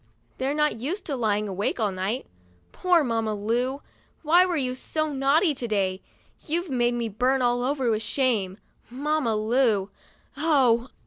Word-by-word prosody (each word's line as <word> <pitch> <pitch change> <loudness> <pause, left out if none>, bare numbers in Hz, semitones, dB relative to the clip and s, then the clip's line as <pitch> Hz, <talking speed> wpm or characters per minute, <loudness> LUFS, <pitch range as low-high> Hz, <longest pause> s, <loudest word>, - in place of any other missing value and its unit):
They're 270 +3 0
not 300 -6 +1
used 325 - -4
to 285 - -3
lying 210 -3 0
awake 200 +5 -2
all 210 -3 +1
night. 190 +7 -3 0.5
Poor 355 -3 +2
Mamma 225 -4 -1
Lu! 245 +7 -1 0.4
Why 345 +4 +5
were 350 -2 -1
you 255 -3 -1
so 310 +4 -3
naughty 285 +5 +3
to 250 -3 -5
day? 195 -3 -1 0.5
You've 340 +1 -2
made 240 -1 +1
me 235 -1 -2
burn 250 +5 +1
all 245 0 +1
over 265 -1 0
with 215 0 0
shame, 215 -5 0 0.3
Mamma 275 -2 -1
Lu. 215 -2 +1 0.4
Oh 270 -6 +2
250 Hz, 155 wpm, -25 LUFS, 220-290 Hz, 0.5 s, Why